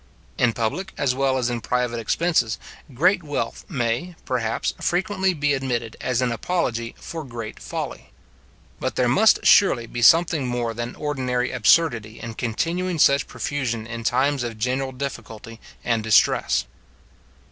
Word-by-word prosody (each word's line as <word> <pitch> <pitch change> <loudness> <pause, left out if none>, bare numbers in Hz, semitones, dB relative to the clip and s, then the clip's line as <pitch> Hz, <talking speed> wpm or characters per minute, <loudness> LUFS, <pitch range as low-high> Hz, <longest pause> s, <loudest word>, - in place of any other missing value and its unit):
In 120 -2 +3
public, 140 - -3
as 140 -3 +1
well 135 0 +1
as 120 -1 0
in 120 -1 -3
private 125 0 -1
expenses, 120 -1 +1 0.3
great 175 +9 +3
wealth, 145 -3 -4
may, 130 +4 -2
perhaps, 115 -3 -1
frequently 190 +1 +1
be 145 -1 +1
admitted 120 -4 -2
as 125 0 0
an 125 - 0
apology 115 -4 -2
for 165 -1 -7
great 115 -5 -7
folly. - - -6 0.7
But - - -3
there 125 - +2
must 205 - +4
surely 135 - +5
be 120 +1 -6
something 160 +1 +5
more 120 -2 -2
than 120 +1 -5
ordinary 130 -4 -1
absurdity 120 -3 +2
in 115 -1 -6
continuing 165 +11 -2
such 140 -1 +4
profusion 125 -6 -3
in 115 0 -6
times 130 +4 +1
of 115 -2 -4
general 130 +4 -1
difficulty 115 -4 -7 0.3
and 115 -2 +1
distress. 100 - +3
125 Hz, 145 wpm, -23 LUFS, 115-145 Hz, 0.7 s, surely